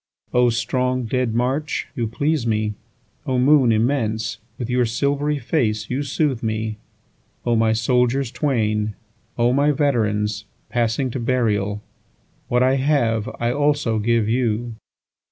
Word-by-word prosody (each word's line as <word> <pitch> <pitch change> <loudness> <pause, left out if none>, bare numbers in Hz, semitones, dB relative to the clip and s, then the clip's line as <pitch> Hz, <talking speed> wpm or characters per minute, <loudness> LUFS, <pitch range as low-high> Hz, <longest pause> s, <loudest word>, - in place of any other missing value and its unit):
8O 125 -1 +4
strong 125 +2 0
dead 120 -1 -1
march, 135 +5 -1
you 115 -2 -1
please 140 +3 -1
me!O 110 +4 -4
moon 130 -1 +5
immense, 110 -2 0 0.2
with 120 - -4
your 125 0 +2
silvery 140 +5 0
face 115 -5 -1
you 130 +3 0
soothe 140 -2 -1
me!O 110 +1 -5
my 110 0 +3
soldiers 125 +2 +1
twain! 110 -6 0 0.4
O 120 +1 +3
my 140 +2 +3
veterans, 105 -8 0 0.2
passing 120 +3 0
to 130 - -4
burial! 105 -4 0 0.6
What 125 +1 +2
I 130 +1 +3
have 130 -5 +1
I 120 0 +1
also 145 -5 +1
give 115 0 +1
you. 120 0 0
120 Hz, 125 wpm, -21 LUFS, 110-130 Hz, 0.6 s, moon